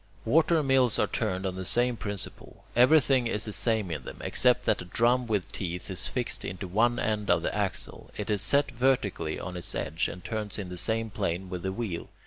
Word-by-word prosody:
Water 160 +5 +4
mills 130 -3 +3
are - - +3
turned 95 +1 -2
on 95 - -1
the 95 - -4
same 120 +5 +2
principle. 100 -3 -5
Everything 130 0 +5
is 110 -1 -1
the 105 - -5
same 100 -1 +1
in 75 -5 -4
them, - - -8
except 125 0 +2
that - - +2
a - - -7
drum 120 +6 +2
with 105 -6 -1
teeth 90 +1 -4
is 95 0 -1
fixed 125 -2 -3
into 90 +2 -5
one 115 +6 +2
end 105 -2 -1
of - - +3
the - - -1
axle. - - -3
It - - -2
is 105 -2 +1
set 140 +7 +2
vertically 120 -10 0
on 90 -1 -6
its 90 - -6
edge, 80 +2 -1
and 90 0 -8
turns 110 -2 -4
in 100 -4 -5
the 90 - -6
same 110 +5 0
plane 90 0 -2
with 90 -1 -4
the 95 - -2
wheel. 100 -5 -4
105 Hz, 215 wpm, -28 LUFS, 90-120 Hz, -, Everything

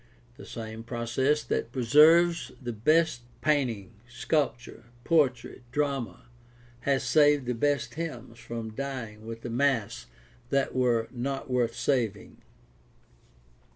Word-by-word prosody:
The - - -12
same 110 -1 -7
process 120 +5 0
that 115 - -2
preserves 155 +7 +5
the 120 -2 -5
best 155 +4 +2 0.2
painting, 125 -10 0 0.2
sculpture, 125 -2 -2 0.2
poetry, 135 -7 +1
drama, 140 -3 -2 0.6
has 135 -1 +2
saved 145 -3 +4
the 125 - -1
best 125 -1 0
hymns 125 -8 -6
from 115 -2 -6
dying 115 -5 -6
with 115 0 -7
the 120 - -6
mass 115 - 0 0.4
that 140 -1 +1
were 120 -3 +1
not 135 +1 -4
worth 120 -2 +1
saving. 115 -7 -1
125 Hz, 115 wpm, -28 LUFS, 115-145 Hz, 0.6 s, preserves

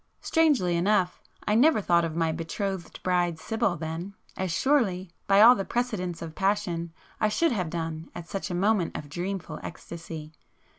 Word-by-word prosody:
Strangely 280 - +3
enough, 180 0 +1 0.3
I 210 - +3
never 265 +3 +5
thought 170 -4 +3
of 165 -1 -3
my 165 -1 +1
betrothed 170 +3 -4
bride 175 -2 +1
Sibyl 220 +1 -1
then, 165 +5 -5 0.2
as 190 -2 -2
surely, 195 - +1 0.2
by 195 +1 +6
all 235 +3 +10
the 195 - -2
precedents 190 -8 -2
of 160 -1 -7
passion, 190 -3 0 0.3
I 215 - +3
should 330 +9 +2
have 185 -8 -1
done 165 -1 -4
at 170 - -7
such 195 +3 -4
a 175 - -2
moment 195 -1 +1
of 145 - -8
dreamful 180 +3 -4
ecstasy. 160 -2 -8
180 Hz, 165 wpm, -27 LUFS, 165-210 Hz, 0.3 s, all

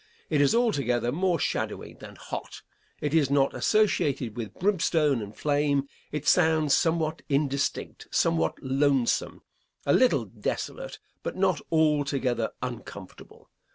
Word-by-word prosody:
It 150 -2 +3
is 145 +9 +4
altogether 140 - +1
more 180 +3 +1
shadowy - - -3
than - - -12
hot. - - -7 0.4
It 145 0 -1
is 155 -5 +3
not 140 -1 +2
associated 140 - +1
with 115 -4 -6
brimstone 165 - +2
and 105 0 -8
flame. 145 -1 +1 0.3
It 150 -1 -4
sounds 160 -4 +4
somewhat 160 -2 +1
indistinct, 140 -1 -1
somewhat 80 -1 +1
lonesome, 135 -2 +1 0.4
a 140 - +3
little 255 -1 +3
desolate, - - -5 0.2
but - - -4
not 185 -5 +1
altogether 140 -7 +1
uncomfortable. 115 -6 -9
145 Hz, 120 wpm, -27 LUFS, 130-160 Hz, 0.4 s, is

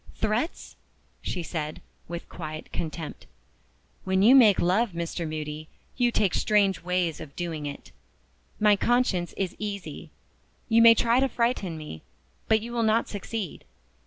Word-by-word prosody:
"Threats?" 220 +9 -2 0.4
she 175 - -3
said, 155 -2 -4 0.3
with 170 0 -6
quiet 155 -2 -7
contempt. 160 -1 -5 0.8
"When 190 0 +2
you 235 +5 +8
make 225 -8 +7
love, 190 +4 +2
Mr. 170 -1 -3
Moody, 155 0 -5 0.3
you 245 -1 +2
take 200 -5 +1
strange 200 -2 +2
ways 180 -2 -1
of 150 -3 -10
doing 160 -4 -4
it. 140 - -8 0.7
My 210 -1 +5
conscience 205 -6 +1
is 190 -2 -2
easy. 205 -2 -6 0.6
You 230 -1 +5
may 230 0 +9
try 235 +2 +3
to 270 0 +2
frighten 235 -8 -1
me, 150 - -8 0.5
but 220 -1 +3
you 235 +2 -7
will 235 - 0
not 225 +1 +2
succeed. 205 -2 -5
190 Hz, 145 wpm, -26 LUFS, 165-225 Hz, 0.8 s, may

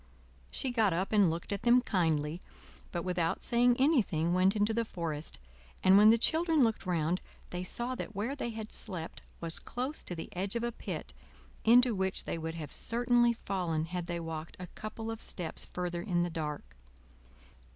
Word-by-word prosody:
She 265 - -2
got 220 -6 +3
up 185 +3 -1
and 205 -5 +5
looked 165 +4 -4
at 200 - -3
them 240 +1 +6
kindly, 165 -7 0 0.5
but 170 -1 -2
without 175 -2 -1
saying 240 +1 +4
anything 210 - +2
went 185 +3 +4
into 210 +1 +2
the 230 +1 +1
forest; 165 - -4 0.5
and 185 +1 +7
when 210 +2 +8
the 230 - +6
children 320 +3 +3
looked 225 -4 0
round 170 0 +1 0.3
they 180 0 -3
saw 240 +7 -2
that 220 -4 -6
where 225 +8 -2
they 255 -4 -3
had 220 -1 -6
slept 180 -6 -5 0.2
was 165 -1 -3
close 260 +5 -4
to 175 - -3
the 170 +4 -8
edge 195 +4 -2
of 235 - -1
a 240 - 0
pit, - - -6 0.5
into 245 +1 +6
which 190 -1 0
they 165 - -3
would 160 0 -4
have 155 -3 -6
certainly 240 0 +3
fallen 180 -8 -2
had 175 +1 -4
they 175 -1 -2
walked 165 -1 -6
a 180 - -5
couple 220 +1 -5
of 225 - -6
steps 170 -4 -3
further 175 -1 -3
in 175 -3 +1
the 175 - -2
dark. 150 - -5
190 Hz, 185 wpm, -32 LUFS, 170-235 Hz, 0.5 s, when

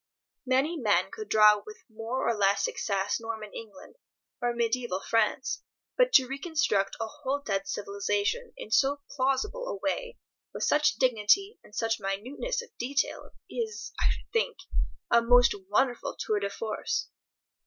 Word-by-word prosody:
Many 270 +6 +2
men 215 -8 +2
could 435 -1 -7
draw 210 -1 +6
with 430 +2 -12
more 230 +3 -3
or 235 - +2
less 200 -1 +3
success 200 +1 -1
Norman 220 -2 -6
England, 210 - -10 0.4
or 240 0 +1
mediaeval 235 -4 -1
France, 230 +3 +1 0.3
but - - +4
to 265 - +7
reconstruct 270 - 0
a 225 - -1
whole 265 +5 -3
dead 195 -7 -2
civilization 205 - -1
in 215 - -8
so 285 +3 +3
plausible 285 - 0
a - - -2
way, 480 +9 -3 0.4
with - - -3
such 300 0 +3
dignity 255 - +2
and 210 - -16
such 225 0 0
minuteness 255 - -3
of 480 - -18
detail, 275 +4 -1 0.2
is, 450 -2 -4
I - - +3
should - - -4
think, 470 +1 +1 0.5
a 235 - +6
most 245 +1 +6 0.2
wonderful 245 +4 +1
tour 210 -1 0
de 200 0 -2
force. 215 +2 -3
240 Hz, 150 wpm, -29 LUFS, 210-295 Hz, 0.5 s, to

